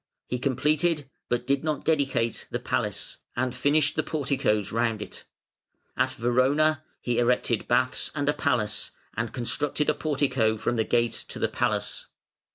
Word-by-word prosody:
He 125 - -3
completed, 150 +3 +1 0.2
but 120 0 0
did 140 +1 +1
not 155 -3 -2
dedicate, 135 -7 +1
the - - -1
palace, - - -2 0.2
and 125 0 -1
finished 145 +3 +2
the - - +2
porticoes 135 -9 0
round 115 -1 +1
it. - - -8 0.7
At 130 +1 +1
Verona 130 +6 +2 0.2
he 120 -1 0
erected 120 -2 +1
baths 125 +1 +1
and 145 -1 -1
a 145 - +4
palace, 110 -9 0 0.3
and 115 0 -2
constructed 145 +5 0
a - - -2
portico 130 -7 +1
from 120 - -1
the 110 -1 +1
gate 120 -1 +1
to - - -6
the - - +1
palace. - - -1
130 Hz, 155 wpm, -27 LUFS, 120-145 Hz, 0.7 s, a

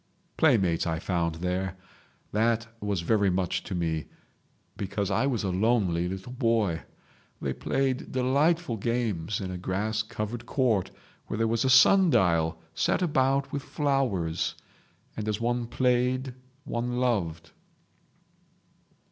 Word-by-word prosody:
"Playmates 95 - +3
I 80 -1 0
found 85 -2 -1
there. 90 +2 -2 0.5
That 115 +2 +1 0.2
was 100 -4 -1
very 100 +2 +2
much 90 -1 0
to 95 - -4
me, 80 -3 -1 0.7
because 100 0 -2
I 115 +8 +2
was 120 -6 -1
a 95 - 0
lonely 95 -4 +1
little 95 +6 -6
boy. 115 - +1 0.6
They - - -2
played 135 -1 -1
delightful 140 +2 +1
games 105 -5 -1
in 95 -2 -4
a 90 - -5
grass 105 +4 -1
covered 110 +1 -5
court 115 -8 +1 0.4
where - - -3
there 115 0 +2
was 115 +2 +1
a - - +3
sun 175 +9 +7
dial 85 - +2
set 185 - +1
about 135 -3 +1
with 140 - -2
flowers. 130 - 0 0.6
And 110 -1 -4
as 105 0 -1
one 120 0 -1
played 125 +1 +1 0.3
one 120 0 -2
loved 85 -10 -1
110 Hz, 130 wpm, -27 LUFS, 90-125 Hz, 0.7 s, sun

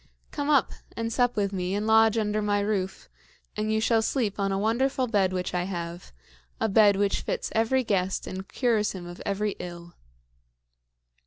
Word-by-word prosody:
Come 285 0 -3
up, 285 -4 +3 0.3
and 230 0 -2
sup 245 0 +2
with 200 -1 0
me, 185 0 -2
and 205 +1 -1
lodge 220 0 +5
under 215 -1 0
my 205 -1 +1
roof; 200 -2 -2 0.5
and 215 +1 -1
you 220 - +2
shall 225 0 +3
sleep 220 -3 -1
on 195 0 0
a 195 - 0
wonderful 255 +6 +1
bed 200 -6 +1
which 180 -1 -3
I 180 0 0
have 175 -2 -6 0.5
a 220 - +1
bed 205 -1 +5
which 200 0 +1
fits - - -3
every 230 +4 +2
guest 190 -4 -1
and 190 +1 -6
cures 225 -5 +1
him 185 -2 -7
of 175 0 -9
every 205 +1 0
ill." 175 -1 -8
210 Hz, 180 wpm, -27 LUFS, 190-225 Hz, 0.5 s, lodge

